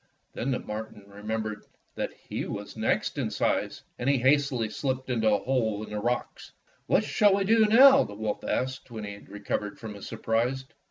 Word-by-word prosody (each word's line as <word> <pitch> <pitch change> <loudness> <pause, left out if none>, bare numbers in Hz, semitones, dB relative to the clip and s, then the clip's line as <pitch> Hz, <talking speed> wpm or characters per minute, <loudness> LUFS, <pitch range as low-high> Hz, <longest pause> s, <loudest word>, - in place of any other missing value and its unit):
Then 125 - -3
the 130 - +1
marten 105 -1 -7
remembered 105 +1 -4 0.3
that - - -3 0.2
he - - -3
was - - -6
the - - -11
next - - 0
in - - -1
size, - - -1 0.2
and 120 - 0
he 140 - +4
hastily 130 -2 +2
slipped 130 +3 -3
into 110 -3 +2
a 105 -1 +1
hole 110 -5 0
in 110 - -9
the 105 - -2
rocks. 120 +3 -3 0.3
"What - - +3
shall 205 -2 +3
we 200 - +1
do 220 +2 +4
now?" 265 +5 +8
the 100 - -8
wolf 105 0 -3
asked 130 +1 -2
when 110 -3 -7
he 100 0 -5
had 100 - -14
recovered 105 0 -4
from 110 -2 -7
his 100 - -9
surprise. 120 +4 -1
115 Hz, 200 wpm, -27 LUFS, 105-135 Hz, 0.3 s, now